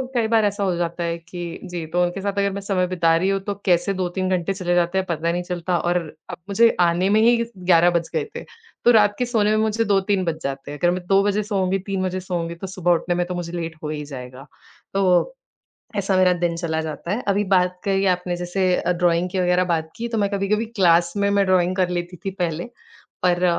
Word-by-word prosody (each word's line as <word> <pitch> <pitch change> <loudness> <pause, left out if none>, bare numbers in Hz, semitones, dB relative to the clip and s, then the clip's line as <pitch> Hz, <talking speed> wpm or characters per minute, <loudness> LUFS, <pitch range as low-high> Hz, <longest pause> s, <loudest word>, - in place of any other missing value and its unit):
कई 230 -2 +2
बार 225 -1 +3
ऐसा 205 0 -1
हो 185 -3 +1
जाता 170 0 -2
है 170 0 -2
कि 170 0 -7
जी, 175 -3 -5
तो 175 +3 0
उनके 175 +2 -2
साथ 200 0 -2
अगर 200 0 +1
मैं 200 +1 -5
समय 190 -2 0
बिता 170 -2 +2
रही 185 +4 +1
हूँ 195 0 +1
तो 205 +1 -3
कैसे 185 +1 +2
2-3 185 0 -2
घंटे 175 +2 -2
चले 180 -2 -1
जाते 175 +1 +1
हैं 190 - +1
पता 170 0 0
नहीं 175 +1 -2
चलता 175 0 -2
और 175 +1 +1 0.3
अब - - -6
मुझे 230 +4 +5
आने 175 +2 +2
में 210 +2 +4
ही 235 +1 +5 0.2
11 175 -1 +4
बज 170 -1 -1
गए 460 - +1
थे, - - -5 0.4
तो 240 - +7
रात 210 -3 +4
के 250 - +1
सोने 220 -4 +1
में 215 - +2
मुझे 220 +1 +1
2-3 195 -1 +1
बज 160 -2 -2
जाते 140 +1 -5
हैं। 145 - -6
अगर 175 - +3
मैं 180 0 -4
2 195 +1 +4
बजे 205 +1 +1
सोऊँगी, 195 -2 0
3 195 0 -3
बजे 185 0 -2
सोऊँगी 175 -2 -4
तो 180 +3 -7
सुबह 185 -2 0
उठने 175 +1 +1
में 175 0 0
तो 180 - -4
मुझे 175 -1 -5
लेट 165 -2 -4
हो 150 - -3
ही 150 -1 -4
जाएगा। 130 -1 -9 0.5
तो 195 - +2 0.6
ऐसा 195 -1 +1
मेरा 185 -1 +5
दिन 170 -1 0
चला 165 -2 -2
जाता 160 +3 -5
है। 230 +5 -2
अभी 200 +1 +2
बात 180 0 0
करी 195 -1 +1
आपने 180 -1 0
जैसे 180 +1 0
अ, 180 - 0
ड्राइंग 175 0 +1
की 190 - -3
वग़ैरह 180 0 +2
बात 160 -3 -1
की 235 +1 -4
तो 230 -1 -2
मैं 200 -1 +1
कभी-कभी 205 +3 0
क्लास 170 -2 +4
में 200 0 +1
मैं 200 -1 +2
ड्राइंग 185 -1 +2
कर 185 -2 +2
लेती 175 0 -4
थी 195 - -1
पहले। 175 +2 -3 0.6
पर 175 0 +2
180 Hz, 240 wpm, -22 LUFS, 175-195 Hz, 0.6 s, तो